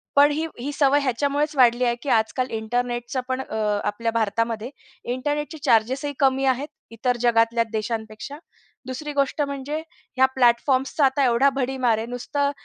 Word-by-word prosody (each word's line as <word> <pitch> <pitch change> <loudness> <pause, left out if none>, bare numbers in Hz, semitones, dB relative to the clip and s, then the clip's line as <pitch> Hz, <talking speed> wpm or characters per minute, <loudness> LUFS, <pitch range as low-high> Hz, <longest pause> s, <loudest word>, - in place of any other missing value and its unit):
पण 290 +1 +6
ही 315 +2 -1
ही 280 +4 -3
सवय 280 0 +3
ह्याच्यामुळेच 285 +3 0
वाढली 245 -1 +4
आहे, 240 0 +1
की 280 - -3
आजकाल 240 +3 +1
इंटरनेटचा 240 +3 -2
पण 260 0 -1
अ, 220 - -7 0.3
आपल्या 230 +2 -1
भारतामध्ये 230 +1 -1 0.4
इंटरनेटचे 295 +4 -3
चार्जेस 245 +5 +2
ही 285 - -3
कमी 270 0 +2
आहेत 265 +3 +1 0.2
इतर 245 +2 -1
जगातल्या 230 -1 +3
देशांपेक्षा. 220 +4 -4 0.5
दुसरी 295 +4 -5
गोष्ट 280 +1 0
म्हणजे 280 +1 -3 0.4
ह्या 260 - +6
प्लॅटफॉर्म्स 255 +2 +2
चा 285 - +5
आता 270 +1 +2
एवढा 245 +3 +4
भडीमार 255 -4 +1
आहे. 225 +1 -4
नुसतं 280 +4 -1
255 Hz, 155 wpm, -23 LUFS, 235-280 Hz, 0.5 s, पण